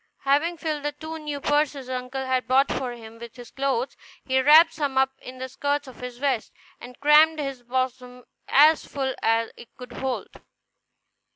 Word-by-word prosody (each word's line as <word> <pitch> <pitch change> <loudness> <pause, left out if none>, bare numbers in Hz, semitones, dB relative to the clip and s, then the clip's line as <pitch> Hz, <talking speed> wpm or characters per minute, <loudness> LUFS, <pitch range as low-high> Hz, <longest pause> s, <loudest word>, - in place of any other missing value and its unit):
Having 295 +5 +1
filled 310 -2 -3
the 295 0 -3
two 315 +2 -7
new 295 -2 -5
purses 290 -1 0
his - - -13
uncle 255 +1 -4
had 260 -1 -1
bought 270 +2 +3
for 255 -2 -3
him 230 -1 -12
with 235 -1 -10
his 245 -2 -12
clothes, 270 -2 -2 0.3
he 260 0 +2
wrapped 310 +5 +7
some 285 -4 -2
up 265 0 +3
in 255 0 -10
the 260 0 -5
skirts 285 +2 -2
of 260 - -13
his 250 -1 -7
vest, 260 -4 -1 0.3
and 245 0 -12
crammed 305 +2 +5
his 275 -4 -4
bosom 250 0 -3 0.2
as 305 +3 +5
full 265 -2 -3
as 225 0 +1
it 235 - -14
could 250 -1 -10
hold. 265 -1 -5
265 Hz, 185 wpm, -24 LUFS, 250-290 Hz, 0.3 s, wrapped